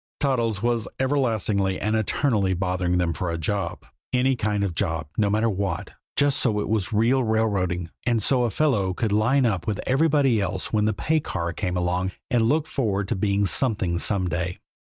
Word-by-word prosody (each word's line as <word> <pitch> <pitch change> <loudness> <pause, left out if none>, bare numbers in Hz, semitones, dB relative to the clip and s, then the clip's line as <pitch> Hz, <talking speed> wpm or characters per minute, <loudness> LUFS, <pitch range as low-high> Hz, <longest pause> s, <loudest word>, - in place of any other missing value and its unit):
Toddles 115 -7 0
was 120 -2 0
everlastingly 110 -8 +1
and 110 +2 0
eternally 110 -3 +1
bothering 90 0 0
them 85 -2 +1
for 85 +2 -3
a 85 - -2
job. 95 +2 -3 0.3
Any 130 +1 +2
kind 105 -3 -1
of 100 - 0
a - - -9
job, 80 -3 -1
no 105 -2 +2
matter 110 +3 +2
what, 95 -5 -2 0.2
just 145 -1 +2
so 110 -5 +1
it - - -2
was 105 -3 -1
real 120 +5 +3
railroading, 100 -6 0
and 120 -4 +1
so 130 +1 +3
a - - +1
fellow 105 -7 +1
could 110 0 -1
line 125 +6 +3
up 95 -7 -1
with 105 -2 -1
everybody 135 -4 +3
else 95 - -3
when 105 -1 +2
the 110 - +2
pay 160 +9 0
car 85 - -3
came 90 -2 -2
along, 90 +1 -1 0.2
and 120 -2 +3
look 155 +1 +2
forward 105 -10 -1
to - - 0
being 100 +1 +1
something 95 -6 +1
some 95 0 0
day. 90 +1 -2
105 Hz, 195 wpm, -24 LUFS, 95-120 Hz, 0.3 s, real